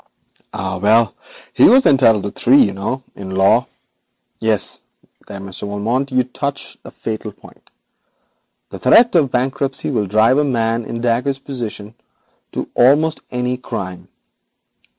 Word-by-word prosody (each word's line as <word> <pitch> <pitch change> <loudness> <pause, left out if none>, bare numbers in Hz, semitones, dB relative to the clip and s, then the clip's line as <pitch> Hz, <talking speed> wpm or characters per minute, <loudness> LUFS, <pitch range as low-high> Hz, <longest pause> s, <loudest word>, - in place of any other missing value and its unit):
'Ah, 95 - -4
well, 110 +2 +3 0.4
he - - +5
was 260 +2 +5
entitled 115 -7 +4
to 100 - -4
three, 130 +4 +3
you 100 - -1
know, 105 +7 -4
in 95 -1 -9
law. 95 +1 +2 0.7
Yes, 110 -3 0 0.5
there, 100 -1 -8
Monsieur 95 +1 -7
Valmont, 115 +7 -2
you 130 0 +2
touch 140 +3 -5
the - - -12
fatal 110 -1 -6
point. 100 - -19 1.0
The - - -9
threat 230 - +5
of 155 -6 +3
bankruptcy 135 +3 -2
will 105 -6 -1
drive 110 +7 +3
a - - +2
man 115 -4 -1
in 115 +1 -5
Dacre's 125 +3 0
position 115 -6 -7 0.6
to - - -4
almost 150 +6 +3
any 125 0 -2
crime. 100 -8 -7
120 Hz, 140 wpm, -18 LUFS, 105-135 Hz, 1.0 s, he